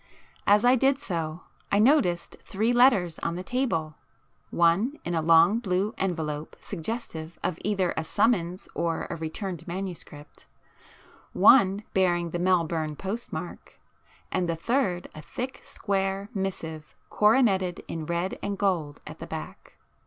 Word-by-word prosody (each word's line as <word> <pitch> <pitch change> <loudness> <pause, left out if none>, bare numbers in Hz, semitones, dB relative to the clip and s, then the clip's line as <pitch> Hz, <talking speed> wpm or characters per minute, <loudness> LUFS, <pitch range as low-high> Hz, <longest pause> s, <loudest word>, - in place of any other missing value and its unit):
As 210 +3 +5
I 250 +1 +6
did 270 +2 +3
so, 165 - -4 0.3
I 200 - +3
noticed 210 - +3
three 220 +5 0
letters 220 -10 +4
on 170 - -2
the 180 - -5
table,—one 185 - -1
in 175 - -2
a 165 - +1
long 165 +6 +5
blue 200 0 -1
envelope 160 -5 -3
suggestive 170 -4 -5
of 180 -2 -2
either 195 -4 0
a 160 - -1
summons 185 -1 0
or 165 -1 -1
a - - -2
returned 165 +3 -5
manuscript,—one 185 - 0
bearing 175 -3 +2
the 175 - -2
Melbourne 165 -4 +1
postmark, 200 +9 -6 0.5
and 175 -2 0
the 165 - 0
third 180 -1 0
a 155 - -9
thick 250 - -6
square 195 0 -2
missive 165 -6 -5 0.2
coroneted 210 -5 +3
in 160 -2 -5
red 170 +2 -2
and 200 -1 -3
gold 170 -8 -1
at - - -9
the - - -7
back. - - -8
185 Hz, 130 wpm, -27 LUFS, 165-210 Hz, 0.5 s, I